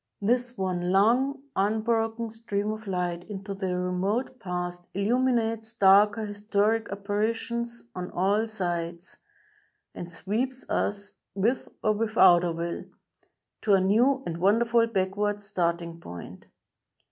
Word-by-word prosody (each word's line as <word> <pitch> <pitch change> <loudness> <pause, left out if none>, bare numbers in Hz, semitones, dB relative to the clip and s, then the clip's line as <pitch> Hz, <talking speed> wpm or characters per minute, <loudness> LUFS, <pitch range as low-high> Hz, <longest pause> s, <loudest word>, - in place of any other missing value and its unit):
This 245 +3 0
one 180 -2 -1
long, 250 +8 +3
unbroken 225 +2 0
stream 215 -2 -2
of 215 0 -7
light 175 -2 -2
into 200 0 -5
the 190 -2 -2
remote 195 +8 -1
Past 175 -3 -5
illuminates 225 +1 +1
darker 205 +1 +5
historic 210 +2 0
apparitions 225 +4 -2
on 180 -1 -5
all 200 +5 +1
sides, 175 -4 -4 0.8
and 175 0 -7
sweeps 240 +10 -3
us, 205 0 -1 0.2
with 225 +6 0
or 215 - +4
without 205 -5 +5
our 175 - 0
will, 170 +1 -4 0.8
to 210 - +3
a 195 - +6
new 240 +8 +3
and 165 -1 -3
wonderful 230 +5 +3
backward 205 0 -1
starting 170 -3 -2
point. 85 - -10
205 Hz, 120 wpm, -27 LUFS, 180-225 Hz, 0.8 s, a